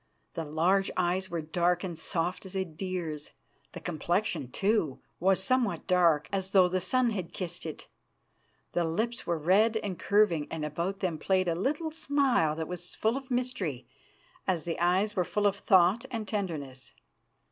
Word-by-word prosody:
The 165 - -3
large 175 +6 +2
eyes 185 +1 0
were 170 -2 -3
dark 175 +3 +1
and 180 -3 -4
soft 175 +3 -2
as 190 - -8
a 190 0 0
deer's. 165 -3 -5 0.4
The - - -6
complexion, 170 - -1
too, 195 - 0 0.2
was 190 +2 +3
somewhat 255 -5 +1
dark, 170 -5 +3
as 190 -1 -1
though 190 -2 +6
the 185 +1 -1
sun 245 +6 +2
had 185 -6 -4
kissed 175 -2 -5
it. 155 - -8 0.8
The 175 - +1
lips 220 +9 -2
were 170 - +1
red 200 +8 +3
and 200 -5 -4
curving, 200 -8 +3
and 160 -2 -3
about 170 +6 -3
them 175 -5 -1
played 185 +2 +1
a 170 - +2
little 290 - -1
smile 275 - +2
that 160 0 -3
was 180 0 -7
full 220 +2 +1
of 270 -1 -6
mystery 245 - -2 0.6
as 175 -4 +1
the 170 - -3
eyes 185 +5 +2
were 180 - +2
full 205 +4 -1
of 200 -1 +3
thought 190 +6 +4
and 225 -4 -4
tenderness. 150 - -4
185 Hz, 170 wpm, -29 LUFS, 165-205 Hz, 0.8 s, though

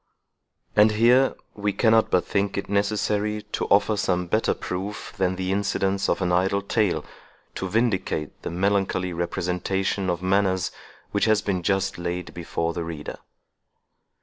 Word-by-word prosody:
And 105 +1 +6
here 120 +5 +4 0.2
we 105 -1 -1
cannot 110 0 +4
but 90 - +2
think 100 0 -1
it 100 - -3
necessary 105 +1 0
to - - -2
offer 100 +2 +3
some 90 -3 0
better 110 +6 +1
proof 95 +3 -5
than 95 -2 0
the 95 0 -2
incidents 100 -1 0
of - - +1
an 90 - +1
idle 95 +3 +2
tale, 100 -7 0 0.5
to 95 - -4
vindicate 95 -8 -1
the - - -4
melancholy 95 0 0
representation 90 +2 -1
of 90 0 -2
manners 95 -1 +1 0.4
which 100 - +1
has 110 -2 +3
been 95 -3 -1
just 95 +1 0
laid 85 +1 -4
before 85 -1 -2
the 85 - -3
reader. 80 -3 -6
95 Hz, 150 wpm, -24 LUFS, 90-105 Hz, 0.5 s, And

